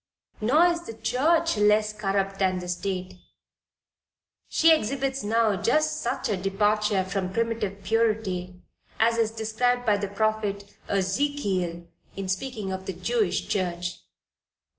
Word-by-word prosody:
Nor 285 Hz, +11 st, +5 dB
is 345 Hz, -1 st, 0 dB
the 225 Hz, -, -7 dB
church 320 Hz, +7 st, +1 dB
less 210 Hz, +1 st, +3 dB
corrupt 195 Hz, -2 st, -1 dB
than 185 Hz, -1 st, +2 dB
the 180 Hz, 0 st, -5 dB
state, 185 Hz, 0 st, -4 dB, 1.3 s
she 325 Hz, 0 st, +5 dB
exhibits 270 Hz, -1 st, -1 dB
now 220 Hz, 0 st, +2 dB
just 305 Hz, +10 st, +1 dB
such 235 Hz, -, -2 dB
a 210 Hz, -, 0 dB
departure 205 Hz, +1 st, +1 dB
from 190 Hz, -1 st, -2 dB
primitive 220 Hz, -3 st, -2 dB
purity 195 Hz, -4 st, -1 dB, 0.4 s
as 230 Hz, +1 st, +3 dB
is 225 Hz, -1 st, +3 dB
described 225 Hz, +3 st, 0 dB
by 210 Hz, -2 st, +3 dB
the 200 Hz, 0 st, -2 dB
prophet 205 Hz, -1 st, -2 dB
Ezekiel 190 Hz, -4 st, -1 dB, 0.3 s
in 195 Hz, -1 st, -4 dB
speaking 200 Hz, +1 st, -3 dB
of 190 Hz, 0 st, -5 dB
the 190 Hz, -, -2 dB
Jewish 205 Hz, +3 st, 0 dB
Church. 180 Hz, -2 st, -2 dB
210 Hz, 130 wpm, -26 LUFS, 190-230 Hz, 1.3 s, Nor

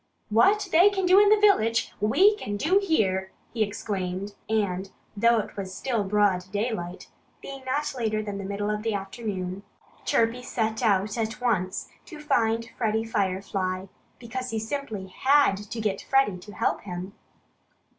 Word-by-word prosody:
"What 390 Hz, -, +4 dB
they 355 Hz, +5 st, +7 dB
can 385 Hz, -2 st, -1 dB
do 370 Hz, +2 st, +7 dB
in 410 Hz, 0 st, +6 dB
the 430 Hz, -, +6 dB
village, 230 Hz, -, +3 dB
we 350 Hz, -, +5 dB
can 205 Hz, -, -4 dB
do 360 Hz, -, +3 dB
here!" 190 Hz, -, +1 dB, 0.2 s
he 230 Hz, -, -2 dB
exclaimed. 200 Hz, -2 st, -2 dB, 0.2 s
And 195 Hz, -3 st, 0 dB, 0.3 s
though 235 Hz, +3 st, +4 dB
it 215 Hz, -, -3 dB
was 190 Hz, -2 st, -5 dB
still 235 Hz, -6 st, -1 dB
broad 195 Hz, -2 st, +2 dB
daylight 200 Hz, -4 st, -3 dB, 0.3 s
being 275 Hz, -1 st, -9 dB
not 290 Hz, +3 st, -1 dB
later 215 Hz, -3 st, -1 dB
than 205 Hz, -1 st, -5 dB
the -, -, -5 dB
middle 200 Hz, +2 st, -2 dB
of 210 Hz, 0 st, -2 dB
the 225 Hz, -1 st, -1 dB
afternoon 195 Hz, -2 st, -4 dB, 0.4 s
Chirpy 230 Hz, +2 st, +1 dB
set 220 Hz, -2 st, -2 dB
out 210 Hz, 0 st, +1 dB
at 220 Hz, 0 st, -2 dB
once 185 Hz, -7 st, -1 dB, 0.2 s
to 315 Hz, -4 st, -10 dB
find 230 Hz, -5 st, 0 dB
Freddie 220 Hz, -1 st, 0 dB
Firefly, 190 Hz, -3 st, -1 dB, 0.3 s
because 250 Hz, +2 st, -5 dB
he 225 Hz, -, -2 dB
simply 220 Hz, -3 st, -4 dB
had 265 Hz, +4 st, +3 dB
to 230 Hz, -, -5 dB
get 210 Hz, -3 st, -1 dB
Freddie 270 Hz, -9 st, +2 dB
to 205 Hz, +4 st, -12 dB
help -, -, -1 dB
him. 185 Hz, 0 st, -6 dB
220 Hz, 160 wpm, -26 LUFS, 195-250 Hz, 0.4 s, they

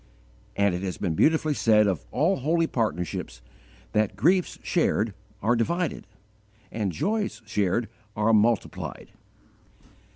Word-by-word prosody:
And 100 Hz, -2 st, +2 dB
it 90 Hz, -, -3 dB
has 95 Hz, -2 st, -4 dB
been 90 Hz, -5 st, -1 dB
beautifully 155 Hz, -, +3 dB
said 110 Hz, -5 st, +4 dB
of 90 Hz, -11 st, -1 dB
all 170 Hz, -, +1 dB
holy 165 Hz, +5 st, +1 dB
partnerships, 90 Hz, -, -3 dB, 0.5 s
that 105 Hz, -2 st, +1 dB
griefs 175 Hz, -, +2 dB
shared 115 Hz, -, +1 dB, 0.3 s
are 120 Hz, +3 st, +3 dB
divided, 170 Hz, -, -1 dB, 0.6 s
and 105 Hz, -4 st, -2 dB
joys 200 Hz, -, -2 dB
shared 105 Hz, +2 st, 0 dB, 0.3 s
are 105 Hz, +2 st, +2 dB
multiplied. 110 Hz, +1 st, 0 dB
110 Hz, 120 wpm, -26 LUFS, 100-155 Hz, 0.6 s, said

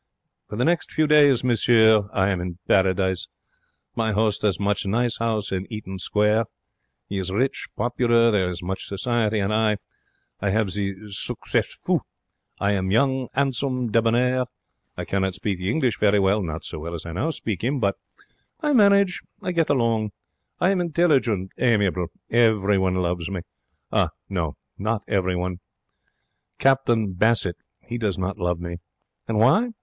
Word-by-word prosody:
For -, -, -6 dB
the 120 Hz, -, +1 dB
next 170 Hz, +1 st, +1 dB
few 155 Hz, -, +2 dB
days, 145 Hz, -4 st, +5 dB
monsieur, 110 Hz, -3 st, +4 dB
I 95 Hz, 0 st, +1 dB
am 95 Hz, -3 st, -1 dB
in 90 Hz, -1 st, -5 dB
Paradise. 95 Hz, -1 st, +2 dB, 0.7 s
My 110 Hz, -1 st, 0 dB
'ost 105 Hz, 0 st, +1 dB
has 100 Hz, -3 st, +1 dB
much 100 Hz, 0 st, 0 dB
nice 115 Hz, +4 st, 0 dB
'ouse 110 Hz, -2 st, -1 dB
in 95 Hz, +2 st, -3 dB
Eaton 95 Hz, -3 st, -6 dB
Square. 105 Hz, +4 st, +2 dB, 0.6 s
He 100 Hz, -, -3 dB
is 95 Hz, -1 st, -2 dB
rich, 130 Hz, +7 st, -1 dB
popular. 120 Hz, -1 st, +3 dB
There 95 Hz, -4 st, +1 dB
is 90 Hz, -1 st, -6 dB
much 95 Hz, +2 st, -4 dB
society. 110 Hz, +1 st, 0 dB
And 100 Hz, +1 st, 0 dB
I 110 Hz, -1 st, +2 dB, 0.6 s
I 100 Hz, -, -1 dB
have 105 Hz, -1 st, +1 dB
the 100 Hz, 0 st, -4 dB
succes 100 Hz, -, -1 dB
fou. -, -, -1 dB, 0.6 s
I 100 Hz, -, +1 dB
am 95 Hz, -2 st, 0 dB
young, 130 Hz, +4 st, +2 dB
'andsome, 130 Hz, -3 st, 0 dB
debonair. 120 Hz, +3 st, +2 dB, 0.5 s
I -, -, -4 dB
cannot 95 Hz, -1 st, -1 dB
speak 95 Hz, -1 st, -3 dB
the 90 Hz, +1 st, -2 dB
English 125 Hz, -4 st, 0 dB
very 105 Hz, -1 st, +4 dB
well 100 Hz, +2 st, +2 dB
not 80 Hz, -2 st, -5 dB
so -, -, -6 dB
well 85 Hz, +2 st, -5 dB
as 85 Hz, -, -7 dB
I 85 Hz, -, -6 dB
now 100 Hz, -, -1 dB
speak 110 Hz, -, -4 dB
'im 135 Hz, +3 st, 0 dB
but 100 Hz, -4 st, +1 dB, 0.6 s
I 300 Hz, -2 st, 0 dB
manage. 200 Hz, -5 st, +4 dB, 0.2 s
I 180 Hz, -, -1 dB
get 165 Hz, -3 st, +1 dB
along. 115 Hz, -6 st, +1 dB, 0.5 s
I 180 Hz, -, +3 dB
am 190 Hz, -2 st, +1 dB
intelligent, 140 Hz, -, +1 dB
amiable. 100 Hz, -7 st, +2 dB, 0.2 s
Everyone 105 Hz, -5 st, +3 dB
loves 90 Hz, -2 st, -1 dB
me. 95 Hz, -3 st, -4 dB, 0.9 s
No, 85 Hz, -7 st, -3 dB, 0.2 s
not 105 Hz, +1 st, -1 dB
everyone. 90 Hz, -2 st, -1 dB, 1.0 s
Captain 120 Hz, -7 st, +2 dB
Bassett, 100 Hz, -2 st, +1 dB, 0.3 s
he 120 Hz, +1 st, -4 dB
does 105 Hz, -5 st, -1 dB
not 95 Hz, +3 st, -3 dB
love 90 Hz, -1 st, -1 dB
me. 85 Hz, 0 st, -5 dB, 0.5 s
And 110 Hz, -, -1 dB
why? 210 Hz, -, +4 dB
105 Hz, 160 wpm, -23 LUFS, 95-120 Hz, 1.0 s, days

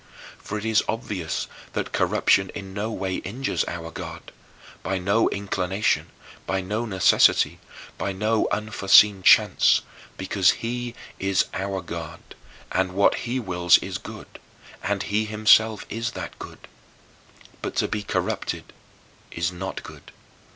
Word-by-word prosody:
For 105 Hz, -, -5 dB
it 105 Hz, -, -5 dB
is 110 Hz, -1 st, +3 dB
obvious 100 Hz, -8 st, -3 dB, 0.3 s
that -, -, -3 dB
corruption 95 Hz, -1 st, +2 dB
in 95 Hz, -2 st, -7 dB
no 105 Hz, +3 st, -3 dB
way 95 Hz, -4 st, -2 dB
injures 130 Hz, +8 st, -2 dB
our 80 Hz, -1 st, -6 dB
God, -, -, -8 dB, 0.5 s
by 95 Hz, -, -2 dB
no 100 Hz, +5 st, +2 dB
inclination, 100 Hz, 0 st, -1 dB, 0.4 s
by 95 Hz, -, 0 dB
no 105 Hz, +5 st, -2 dB
necessity, 95 Hz, -4 st, +4 dB, 0.4 s
by 100 Hz, -, -1 dB
no 105 Hz, +3 st, +1 dB
unforeseen 105 Hz, -1 st, +4 dB
chance -, -, +5 dB, 0.4 s
because 95 Hz, 0 st, +2 dB
he 120 Hz, 0 st, -3 dB, 0.2 s
is 95 Hz, 0 st, +2 dB
our 95 Hz, 0 st, -3 dB
God, 85 Hz, -1 st, -7 dB, 0.5 s
and 95 Hz, 0 st, 0 dB
what 100 Hz, +1 st, +4 dB, 0.2 s
he 130 Hz, +2 st, 0 dB
wills 90 Hz, -5 st, +4 dB
is -, -, -5 dB
good, -, -, -11 dB, 0.4 s
and -, -, -1 dB
he 105 Hz, +2 st, 0 dB
himself 110 Hz, 0 st, +4 dB
is 115 Hz, +1 st, -3 dB
that 90 Hz, -6 st, -7 dB
good. -, -, -11 dB, 0.9 s
But -, -, -4 dB
to -, -, +1 dB
be 105 Hz, -, -3 dB
corrupted 100 Hz, -, -3 dB, 0.6 s
is 85 Hz, +1 st, -2 dB
not 95 Hz, +2 st, -6 dB
good. -, -, -12 dB
100 Hz, 135 wpm, -24 LUFS, 95-110 Hz, 0.9 s, chance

